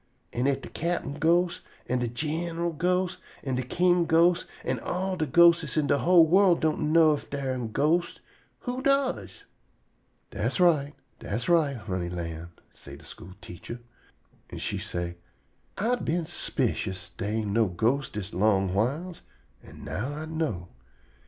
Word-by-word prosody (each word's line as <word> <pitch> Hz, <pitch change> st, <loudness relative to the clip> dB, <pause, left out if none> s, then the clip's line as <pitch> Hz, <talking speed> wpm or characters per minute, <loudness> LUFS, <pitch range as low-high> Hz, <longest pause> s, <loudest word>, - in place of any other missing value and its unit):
An' 125 Hz, +3 st, 0 dB
if 135 Hz, -1 st, +1 dB
de -, -, -7 dB
cap'n 165 Hz, -4 st, -3 dB
ghost 170 Hz, +2 st, +2 dB, 0.3 s
an' 125 Hz, +1 st, 0 dB
de 120 Hz, -, -1 dB
gin'ral 165 Hz, +7 st, -2 dB
ghost 180 Hz, +3 st, 0 dB, 0.2 s
an' 135 Hz, -, -2 dB
de 125 Hz, -, 0 dB
king 175 Hz, +6 st, +2 dB
ghost 170 Hz, +2 st, +4 dB, 0.2 s
an' -, -, -1 dB
all 185 Hz, +1 st, -2 dB
de 160 Hz, -4 st, -1 dB
ghostes 170 Hz, +2 st, +5 dB
in 155 Hz, -, +3 dB
de 140 Hz, -, +2 dB
whole 175 Hz, -2 st, +6 dB
worl' 185 Hz, +2 st, +5 dB
don' 155 Hz, -1 st, 0 dB
know 160 Hz, -1 st, +6 dB
ef 145 Hz, -, -5 dB
dar 140 Hz, -2 st, -2 dB
am 120 Hz, -3 st, -4 dB
ghostes, 160 Hz, +8 st, +1 dB, 0.4 s
who 250 Hz, +1 st, -3 dB
does?" 275 Hz, -1 st, 0 dB, 0.9 s
"Das -, -, -2 dB
right; 150 Hz, -5 st, +3 dB, 0.2 s
das 115 Hz, +4 st, -4 dB
right, 155 Hz, -6 st, +3 dB
honey 95 Hz, -5 st, -3 dB
lamb," 85 Hz, -1 st, -5 dB, 0.2 s
say 70 Hz, -, -10 dB
de -, -, -15 dB
school 90 Hz, +2 st, -11 dB
teacher. 90 Hz, +7 st, -8 dB, 0.7 s
An' -, -, -8 dB
she -, -, -3 dB
say: 85 Hz, 0 st, -4 dB, 0.6 s
"I 225 Hz, +5 st, +1 dB
been 170 Hz, -5 st, -1 dB
s'picious 110 Hz, -, -3 dB
dey 105 Hz, +3 st, -3 dB
ain' 100 Hz, -2 st, -3 dB
no 115 Hz, -1 st, +3 dB
ghostes 120 Hz, +10 st, 0 dB
dis 105 Hz, -2 st, -6 dB
long 95 Hz, -1 st, +2 dB
whiles, 145 Hz, -, -1 dB, 0.4 s
an' -, -, -13 dB
now 130 Hz, +9 st, -4 dB
I 155 Hz, +1 st, -5 dB
know. 155 Hz, -, -3 dB
145 Hz, 160 wpm, -27 LUFS, 110-170 Hz, 0.9 s, whole